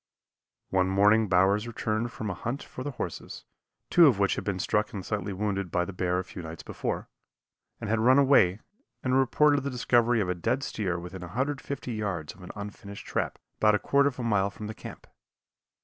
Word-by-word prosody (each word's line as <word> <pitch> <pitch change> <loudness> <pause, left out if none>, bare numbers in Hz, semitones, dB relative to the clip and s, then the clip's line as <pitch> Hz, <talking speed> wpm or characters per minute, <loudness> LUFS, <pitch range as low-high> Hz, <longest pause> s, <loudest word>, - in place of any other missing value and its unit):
One 95 -1 +3
morning 105 +3 +4
Bowers 100 +4 +3
returned 115 0 -2
from 110 -2 -4
a - - -2
hunt 120 +9 -4
for 130 - -8
the 145 - -3
horses, 135 - -6 0.5
two 170 -2 +8
of 125 -8 +4
which 100 -1 +2
had - - -4
been 100 -2 -2
struck 105 +3 0
and 95 -3 -5
slightly 105 -1 -2
wounded 100 -1 -2
by 90 +1 0
the 100 - -7
bear 90 0 0
a 90 - -1
few 95 - -9
nights 80 0 -8
before, - - -4 0.7
and - - -5
had 110 +1 +1
run 125 +4 +5
away, 130 -9 +5 0.4
and 130 0 +1
reported 145 +2 +4
the 140 - -3
discovery 120 -2 +2
of 100 - 0
a 90 - +1
dead 120 +10 -1
steer 95 -10 -2
within 90 +2 -8
150 130 +6 -3
yards 95 -9 -3
of 95 - -17
an 90 - -10
unfinished 100 -1 -8
trap, - - -2 0.2
about 105 -1 +4
a - - +4
quarter 140 +5 +3
of 130 - -12
a 125 - -4
mile 100 -4 +2
from 105 +1 -8
camp. - - -10
105 Hz, 200 wpm, -28 LUFS, 95-120 Hz, 0.7 s, two